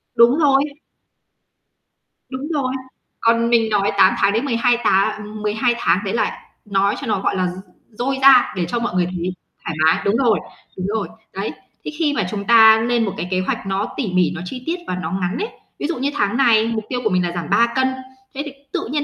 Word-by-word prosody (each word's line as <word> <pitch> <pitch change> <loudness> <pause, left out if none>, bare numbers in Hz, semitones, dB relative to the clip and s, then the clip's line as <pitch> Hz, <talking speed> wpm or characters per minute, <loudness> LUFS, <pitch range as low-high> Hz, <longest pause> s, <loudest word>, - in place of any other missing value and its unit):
Đúng 240 +5 +5
rồi. 275 -2 +4 1.7
Đúng 265 +2 -5
rồi. 260 -3 -1 0.5
Còn 230 0 +2
mình 230 -2 +3
nói 205 -2 +1
8 190 -1 +6
tháng 200 - +2
đến 230 +6 0
12 240 -1 +2
táng 210 +2 0
12 220 +3 +1
tháng 180 - +2
đấy 195 - -2
là 235 - -1 0.3
nói 200 0 +1
cho 275 - -6
nó, 215 - 0
gọi - - 0
là, 185 -1 0
d 190 +4 -12
dôi 265 +3 -1
ra 265 -2 +6
để 180 -2 -1
cho 240 - -2
mọi 235 -6 -3
người 180 - +2
thấy 180 0 -4 0.3
thoải 165 - -4
mái. 160 - +3
Đúng 200 +3 +2
rồi, 235 -4 +2 0.4
đúng 185 +1 -3
rồi. 210 -1 -2 0.3
Đấy, 195 +2 -3 0.3
thế - - -4
khi 305 -3 +1
mà 215 - 0
chúng 200 -1 -4
ta 220 -1 +7
nên 240 -2 +1
một 195 - -3
cái 180 - -4
kế 185 - +1
hoạch 185 - -3
nó 195 +4 -2
tỉ 225 -9 -2
mỉ, 180 -1 +2
nó 175 - -6
chi 250 +6 -7
tiết 330 - -1
và 180 - -2
nó 175 -3 -4
ngắn 185 +2 -2
ấy. 430 - -2 0.3
Ví 295 - -2
dụ 340 - -3
như 275 +2 -1
tháng 205 -3 0
này 230 -4 +4
mục 225 -1 -2
tiêu 250 - -2
của 220 - +2
mình 180 -1 +1
là 175 - -2
giảm 170 -3 -5
3 235 0 +3
cân, 260 0 +2 0.5
thế 275 - -4
thì 290 - -6 0.2
tự - - -3
nhiên 295 0 0
220 Hz, 230 wpm, -20 LUFS, 190-250 Hz, 1.7 s, ta